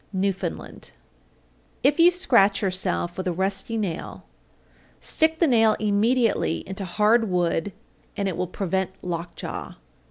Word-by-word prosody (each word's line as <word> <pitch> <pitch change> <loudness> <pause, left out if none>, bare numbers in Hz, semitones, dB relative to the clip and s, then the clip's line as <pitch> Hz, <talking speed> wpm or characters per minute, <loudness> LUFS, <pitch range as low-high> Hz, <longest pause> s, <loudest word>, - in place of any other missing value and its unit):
Newfoundland. 195 -1 -3 0.9
818. 290 - +5
If 290 - -16
you 340 +1 +8
scratch 235 - +3
yourself 185 -2 -1
with 185 0 -3
a - - +1
rusty 195 +5 -1
nail, 190 -7 -4 0.8
stick 320 0 +1
the 335 - +3
nail 225 -6 +4
immediately 215 -2 +1
into 190 +1 -5
hard 215 +5 +2
wood, 175 +1 0 0.5
and 200 - -1
it 185 - -2
will 180 +1 -2
prevent 190 0 -2
lockjaw. 170 -1 -5
195 Hz, 130 wpm, -24 LUFS, 180-225 Hz, 0.9 s, you